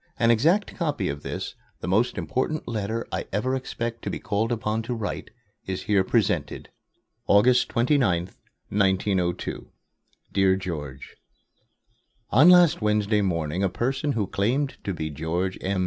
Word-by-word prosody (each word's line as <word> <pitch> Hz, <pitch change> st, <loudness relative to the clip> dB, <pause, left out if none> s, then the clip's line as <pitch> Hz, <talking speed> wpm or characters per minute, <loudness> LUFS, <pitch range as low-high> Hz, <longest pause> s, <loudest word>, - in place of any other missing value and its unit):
An 115 Hz, 0 st, +4 dB
exact 165 Hz, -, +2 dB
copy 145 Hz, -, -1 dB
of 70 Hz, +1 st, -4 dB
this -, -, -5 dB, 0.3 s
the -, -, -5 dB
most 110 Hz, +7 st, +1 dB
important 135 Hz, +4 st, -2 dB
letter 115 Hz, 0 st, -2 dB
I -, -, -3 dB
ever 115 Hz, +7 st, 0 dB
expect 115 Hz, -3 st, -4 dB
to -, -, -4 dB
be -, -, -3 dB
called 110 Hz, +3 st, -1 dB
upon 110 Hz, -1 st, -1 dB
to 120 Hz, +2 st, -4 dB
write 110 Hz, -3 st, -4 dB, 0.4 s
is 95 Hz, -1 st, -3 dB
here 100 Hz, -4 st, +2 dB
presented: 95 Hz, -, 0 dB, 0.6 s
AUGUST 120 Hz, +5 st, +5 dB
29, 115 Hz, -, +1 dB, 0.4 s
1902. 95 Hz, -3 st, 0 dB, 0.6 s
DEAR 95 Hz, -1 st, +4 dB
GEORGE: 75 Hz, -8 st, -6 dB, 1.1 s
On 140 Hz, +10 st, +7 dB
last 175 Hz, -6 st, +6 dB
Wednesday 105 Hz, 0 st, +2 dB
morning 85 Hz, -2 st, -1 dB
a 100 Hz, -, +2 dB
person 130 Hz, -, -1 dB
who 110 Hz, -5 st, 0 dB
claimed 125 Hz, +9 st, 0 dB
to 100 Hz, -, -2 dB
be 80 Hz, -1 st, -4 dB
George 85 Hz, +5 st, -2 dB
M. 95 Hz, 0 st, -1 dB
105 Hz, 145 wpm, -25 LUFS, 95-120 Hz, 1.1 s, On